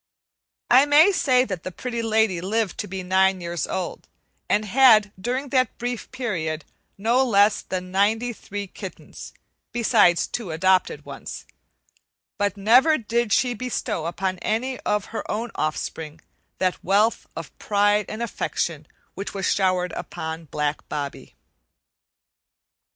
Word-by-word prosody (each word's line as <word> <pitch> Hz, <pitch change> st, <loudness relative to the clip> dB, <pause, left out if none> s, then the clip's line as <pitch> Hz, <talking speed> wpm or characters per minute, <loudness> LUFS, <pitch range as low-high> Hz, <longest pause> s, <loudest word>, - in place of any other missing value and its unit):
I 260 Hz, +4 st, +7 dB
may 300 Hz, +7 st, +7 dB
say 260 Hz, -9 st, +3 dB
that 185 Hz, -8 st, -5 dB
the 185 Hz, -, -6 dB
Pretty 235 Hz, +4 st, -4 dB
Lady 220 Hz, -5 st, +1 dB
lived 210 Hz, +1 st, -1 dB
to -, -, -3 dB
be 190 Hz, 0 st, -5 dB
nine 190 Hz, +1 st, +3 dB
years 170 Hz, -2 st, -3 dB
old, 185 Hz, -2 st, -4 dB, 0.4 s
and 210 Hz, +1 st, +2 dB
had, 220 Hz, -2 st, +5 dB
during 255 Hz, +5 st, -2 dB
that 255 Hz, -3 st, +1 dB
brief 245 Hz, -1 st, -4 dB
period, 170 Hz, -, -3 dB, 0.3 s
no 235 Hz, +6 st, +2 dB
less 205 Hz, -3 st, +4 dB
than 185 Hz, -1 st, -5 dB
ninety 220 Hz, +5 st, +1 dB
three 205 Hz, -1 st, -6 dB
kittens, 190 Hz, -, -10 dB, 0.4 s
besides 220 Hz, -7 st, +4 dB
two 225 Hz, -7 st, -5 dB
adopted 185 Hz, +3 st, +1 dB
ones; -, -, -8 dB, 0.9 s
but 205 Hz, -1 st, 0 dB
never 250 Hz, +10 st, +5 dB
did 235 Hz, -1 st, -1 dB
she 245 Hz, +4 st, +3 dB
bestow 225 Hz, -7 st, -3 dB
upon 185 Hz, +1 st, -2 dB
any 250 Hz, +4 st, -2 dB
of 210 Hz, -1 st, -1 dB
her -, -, -3 dB
own 225 Hz, +3 st, -2 dB
offspring 155 Hz, 0 st, -4 dB, 0.4 s
that 185 Hz, -1 st, -1 dB
wealth 205 Hz, +5 st, +2 dB
of -, -, -8 dB
pride 205 Hz, 0 st, +2 dB
and 220 Hz, +2 st, -4 dB
affection 165 Hz, -8 st, -3 dB, 0.3 s
which 200 Hz, +2 st, -6 dB
was 195 Hz, -1 st, 0 dB
showered 185 Hz, -2 st, +1 dB
upon 160 Hz, 0 st, -6 dB
black 150 Hz, 0 st, -3 dB
Bobbie. 145 Hz, -2 st, -5 dB
205 Hz, 135 wpm, -24 LUFS, 185-235 Hz, 0.9 s, I